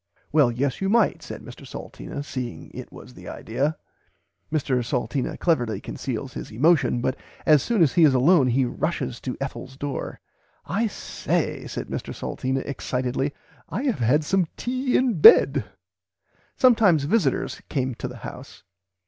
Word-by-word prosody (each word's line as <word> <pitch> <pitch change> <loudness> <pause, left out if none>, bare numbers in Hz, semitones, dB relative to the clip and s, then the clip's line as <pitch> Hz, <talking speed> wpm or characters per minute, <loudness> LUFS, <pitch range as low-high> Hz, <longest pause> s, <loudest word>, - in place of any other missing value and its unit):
Well 145 -5 +4
yes 130 +6 -2
you 195 - +1
might 225 -1 +3
said - - -8
Mr - - -11
Salteena 140 - -7
seeing 125 -5 -6
it - - -9
was 65 -1 -12
the - - -12
idear." 140 +7 -2 0.8
Mr 135 -5 0
Salteena 125 +1 -2
cleverly 125 -10 +1
conceals - - -5
his - - -7
emotion, 130 0 +3
but 130 +1 0 0.3
as 150 -3 +6
soon 225 -7 +2
as 150 - +2
he 175 - +5
is 145 -4 +6
alone 140 +2 +5
he 130 +2 +2
rushes 130 -2 -2
to 125 - -4
Ethel's 130 -1 -6
door, 140 -1 -4 0.5
"I 220 +6 0
say 205 - -2
said - - -5
Mr - - -5
Salteena 130 +1 -2
excitedly 130 0 -2 0.4
I 255 - -3
have 255 - 0
had 130 +6 +3
some 185 +2 +1
tea 255 +1 0
in 255 -3 +1
bed." 455 +3 +8 0.9
"Sometimes 215 - +5
visitors 155 - 0
came 130 -2 -1
to 125 - -5
the 125 -1 -9
house." 125 -6 -10
140 Hz, 155 wpm, -24 LUFS, 125-175 Hz, 0.9 s, bed